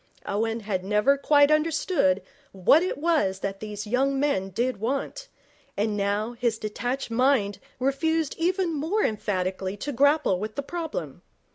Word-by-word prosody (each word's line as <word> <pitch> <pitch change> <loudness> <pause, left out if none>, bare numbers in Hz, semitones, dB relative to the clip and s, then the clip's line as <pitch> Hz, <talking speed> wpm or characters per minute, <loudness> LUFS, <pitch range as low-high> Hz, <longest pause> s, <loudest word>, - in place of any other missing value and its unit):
Owen 225 +3 -1
had 200 -3 -2
never 210 +7 +3
quite 285 +1 +4
understood 305 - +2 0.3
what 195 - +5
it 365 - -2
was 285 - +1
that 195 0 -3
these 210 0 -6
young 270 +5 +1
men 270 -10 0
did 240 +5 -1
want, 275 - -3 0.5
and 210 +1 0
now 205 +3 -1
his 235 -2 -1
detached 245 +4 -3
mind 230 -5 +2 0.2
refused 310 +4 0
even 355 0 +1
more 325 +9 0
emphatically 190 -2 -2
to 290 +8 -4
grapple 285 - +3
with 215 +2 -5
the 280 - -3
problem. 330 +1 -5
245 Hz, 145 wpm, -26 LUFS, 205-295 Hz, 0.5 s, what